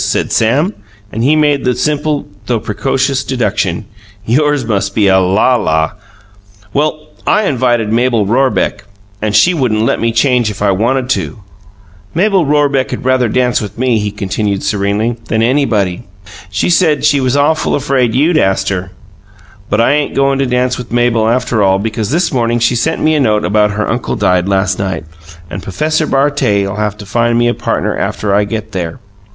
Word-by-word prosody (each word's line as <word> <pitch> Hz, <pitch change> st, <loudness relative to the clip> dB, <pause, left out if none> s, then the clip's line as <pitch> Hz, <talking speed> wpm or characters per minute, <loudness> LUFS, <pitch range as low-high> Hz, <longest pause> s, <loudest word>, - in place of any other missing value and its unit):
said -, -, -1 dB
Sam, 140 Hz, -, +1 dB, 0.4 s
and 115 Hz, -, -3 dB
he 145 Hz, +5 st, +3 dB
made 145 Hz, -2 st, +2 dB
the 125 Hz, -1 st, +1 dB
simple 150 Hz, +2 st, -1 dB, 0.2 s
though 120 Hz, -2 st, 0 dB
precocious 135 Hz, +5 st, -1 dB
deduction: 105 Hz, -7 st, -1 dB, 0.4 s
"Yours 145 Hz, +3 st, +1 dB
must 105 Hz, -4 st, -1 dB
be 105 Hz, -, +2 dB
a 95 Hz, 0 st, +4 dB
lala! 95 Hz, -4 st, +1 dB, 0.8 s
Well, 155 Hz, +1 st, -1 dB, 0.2 s
I 215 Hz, -, +3 dB
invited 120 Hz, -, 0 dB
Mabel 120 Hz, -2 st, +2 dB
Rorebeck, 120 Hz, -3 st, 0 dB, 0.4 s
and 105 Hz, -1 st, -1 dB
she 180 Hz, -, +5 dB
wouldn't 120 Hz, -9 st, 0 dB
let -, -, 0 dB
me 115 Hz, 0 st, 0 dB
change 120 Hz, -1 st, +2 dB
if 105 Hz, -, -7 dB
I 100 Hz, -1 st, +2 dB
wanted 125 Hz, +6 st, 0 dB
to. 95 Hz, -, -3 dB, 0.7 s
Mabel 190 Hz, -2 st, +2 dB
Rorebeck'd 145 Hz, -4 st, 0 dB
rather 130 Hz, -2 st, +2 dB
dance 125 Hz, +1 st, +1 dB
with 105 Hz, -1 st, -7 dB
me," 125 Hz, -2 st, +1 dB
he 105 Hz, 0 st, -2 dB
continued 100 Hz, 0 st, -3 dB
serenely, 100 Hz, +4 st, -1 dB
"than 110 Hz, 0 st, 0 dB
anybody; 115 Hz, -8 st, +1 dB
and 120 Hz, -, -14 dB, 0.4 s
she 95 Hz, -, -1 dB
said 160 Hz, -5 st, +2 dB
she 145 Hz, -2 st, +3 dB
was 130 Hz, +1 st, +1 dB
awful 155 Hz, +3 st, +1 dB
afraid 130 Hz, -5 st, 0 dB
you'd 155 Hz, +4 st, +3 dB
ast 95 Hz, -5 st, +1 dB
her. 95 Hz, -2 st, -3 dB, 0.8 s
But 105 Hz, -, +1 dB
I 115 Hz, -, +3 dB
ain't 145 Hz, 0 st, 0 dB
goin' 135 Hz, 0 st, +2 dB
to 135 Hz, -, +1 dB
dance 125 Hz, 0 st, 0 dB
with 125 Hz, -, -8 dB
Mabel 120 Hz, -2 st, +2 dB
after 120 Hz, -2 st, 0 dB
all, 95 Hz, -1 st, +3 dB
because 110 Hz, +1 st, -3 dB
this 165 Hz, +4 st, +1 dB
morning 120 Hz, -2 st, +1 dB
she 115 Hz, +1 st, +2 dB
sent 160 Hz, +7 st, -1 dB
me 155 Hz, -, +3 dB
a 155 Hz, -, +2 dB
note 105 Hz, -8 st, +1 dB
about 105 Hz, +3 st, +2 dB
her 105 Hz, -, -1 dB
uncle 120 Hz, +1 st, -2 dB
died 90 Hz, -2 st, +1 dB
last 95 Hz, -1 st, 0 dB
night 95 Hz, -5 st, -3 dB, 0.4 s
and 95 Hz, +1 st, -6 dB
P'fessor 155 Hz, -, -1 dB
Bartet'll 105 Hz, -9 st, +1 dB
have 105 Hz, -1 st, -2 dB
to 105 Hz, -, -10 dB
find 120 Hz, +3 st, +1 dB
me 120 Hz, 0 st, +2 dB
a 120 Hz, -, +1 dB
partner -, -, -2 dB
after 100 Hz, -2 st, -2 dB
I 105 Hz, +1 st, +2 dB
get 110 Hz, 0 st, -5 dB
there. 85 Hz, -5 st, -4 dB
120 Hz, 180 wpm, -13 LUFS, 105-135 Hz, 0.8 s, she